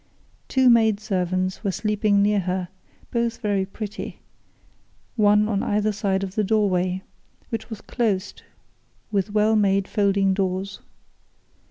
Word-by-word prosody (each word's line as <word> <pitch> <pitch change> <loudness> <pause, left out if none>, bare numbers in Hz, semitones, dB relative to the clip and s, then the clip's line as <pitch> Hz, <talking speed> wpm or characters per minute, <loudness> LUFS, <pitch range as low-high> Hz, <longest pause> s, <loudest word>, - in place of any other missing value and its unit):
Two 260 -1 +3
maid 220 -3 +5
servants 185 -2 -2
were 200 - 0
sleeping 210 0 +1
near 205 0 +3
her, 180 -1 -2 0.4
both 235 -1 0
very 200 -3 -1
pretty, 210 +1 -6 1.0
one 210 -1 +4
on 205 -2 0
either 210 +1 +1
side 195 -1 -1
of 190 -1 -5
the 215 - 0
doorway, 190 -3 +1 0.5
which 230 -1 -4
was 220 -3 -7
closed 210 -6 -2 0.7
with 200 -1 0
well 215 +1 +3
made 195 -2 +2
folding 200 -2 +2
doors. 190 0 -2
205 Hz, 130 wpm, -23 LUFS, 190-215 Hz, 1.0 s, maid